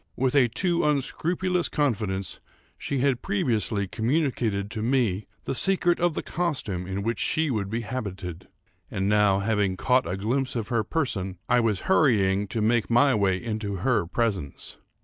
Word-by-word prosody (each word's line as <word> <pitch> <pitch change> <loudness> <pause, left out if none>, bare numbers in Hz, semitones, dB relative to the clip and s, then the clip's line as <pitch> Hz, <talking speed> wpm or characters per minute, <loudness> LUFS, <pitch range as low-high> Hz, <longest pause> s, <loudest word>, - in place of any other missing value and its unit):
With 130 0 +1
a 135 -4 +5
too 175 - 0
unscrupulous 170 +5 0
confidence 105 - -1 0.4
she 140 - -3
had 135 -3 +1
previously 115 - 0
communicated 110 - 0
to 110 - -4
me 115 -5 +1 0.2
the - - -2
secret 175 +3 +1
of 175 -2 +1
the - - -3
costume 130 - -2
in 95 +1 -3
which 115 +2 -1
she 160 -2 +1
would 100 -5 -2
be 115 +3 -2
habited, 95 -7 -5 0.4
and 95 0 -1
now, 105 -2 +3
having 100 -3 0
caught 125 -3 +2
a 90 - -2
glimpse 125 +7 -1
of 115 -2 -3
her 115 -3 +1
person, 100 - -2
I 125 - +4
was 110 -5 +1
hurrying 105 - +3
to 110 +1 -2
make 115 +1 +2
my 135 +4 +5
way 100 -4 +2
into 110 -1 -3
her 115 -9 +2
presence. 95 - -2
115 Hz, 165 wpm, -26 LUFS, 100-135 Hz, 0.4 s, a